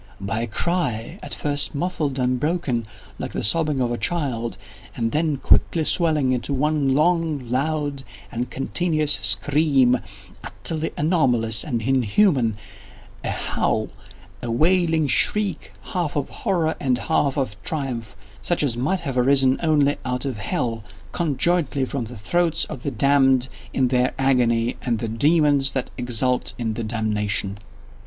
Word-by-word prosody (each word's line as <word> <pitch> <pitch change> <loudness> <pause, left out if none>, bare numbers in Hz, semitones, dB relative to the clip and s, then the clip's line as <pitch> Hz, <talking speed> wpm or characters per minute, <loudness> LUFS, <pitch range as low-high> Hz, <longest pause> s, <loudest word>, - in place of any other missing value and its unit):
—by 100 +3 -2
a 120 - -2
cry, 160 - -2
at - - -5
first 145 0 0
muffled 150 -4 -2
and 125 -1 0
broken, 145 -7 -1 0.3
like - - -5
the - - -3
sobbing 150 +5 +1
of 125 -2 0
a 120 - -3
child, 120 -5 -1 0.4
and 115 -1 -1
then 155 -1 0
quickly 160 +4 +2
swelling 155 -5 +2
into 130 +3 -1
one 145 -1 +1
long, 155 -4 +1
loud, 145 +1 -1 0.3
and 120 +1 -3
continuous 155 +2 0
scream, 140 -4 +3 0.4
utterly 160 0 -2
anomalous 125 -9 +2
and 120 -6 -3
inhuman—a 115 - -1
howl—a 95 +5 -4
wailing 160 +4 +2
shriek, 210 +8 0 0.2
half 175 -5 -1
of 145 -2 -1
horror 175 -7 -1
and 130 -3 +1
half 145 -1 0
of 130 -7 -1
triumph, 125 -9 -4 0.3
such 175 -3 0
as 130 -5 0
might 150 +10 -1
have 135 -6 -2
arisen 135 0 +3
only 145 -3 +2
out 125 +1 -2
of 130 -5 -3
hell, 115 +2 -2 0.3
conjointly 155 -3 +1
from 130 -2 -4
the 120 +1 -9
throats 165 +9 +1
of 135 -5 -8
the 140 - -2
damned 135 0 +3 0.2
in 130 -2 +1
their 125 0 +1
agony 120 -3 +2
and 120 -2 0
of - - -5
the - - -5
demons 145 -2 +4
that 130 - -2
exult 125 0 0
in 115 -2 -2
the 115 +1 -4
damnation. 105 -3 0
135 Hz, 145 wpm, -22 LUFS, 120-155 Hz, 0.4 s, demons